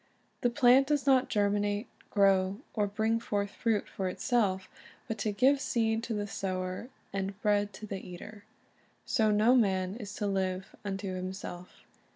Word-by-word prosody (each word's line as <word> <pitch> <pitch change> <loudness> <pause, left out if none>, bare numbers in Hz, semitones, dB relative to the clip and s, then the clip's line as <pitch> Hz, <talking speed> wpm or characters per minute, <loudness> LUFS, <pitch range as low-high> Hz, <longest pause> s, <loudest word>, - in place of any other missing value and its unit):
The 245 - +3
plant 255 +2 +5
does 295 -1 +1
not 265 -2 +4
germinate, 205 +1 +1 0.2
grow, 195 0 +3
or 210 -2 +1
bring 220 +3 0
forth 205 -3 -2
fruit 225 -3 0
for 190 -1 -3
itself, 195 -3 0 0.4
but 225 - -4
to 215 - 0
"give 265 +6 +3
seed 225 -3 +1
to 230 - -3
the 205 0 -2
sower, 185 +2 -3 0.2
and 195 0 -3
bread 205 -1 +2
to 200 +3 -8
the 195 -2 -5
eater. 205 +4 -10 0.5
"^ - - -39
So 220 -2 +2
no 215 +4 +4
man 190 -5 +2
is 205 -3 -7
to 210 - -2
live 190 -1 -2
unto 195 -1 -3
himself. 185 -1 -7
205 Hz, 165 wpm, -30 LUFS, 190-225 Hz, 0.5 s, plant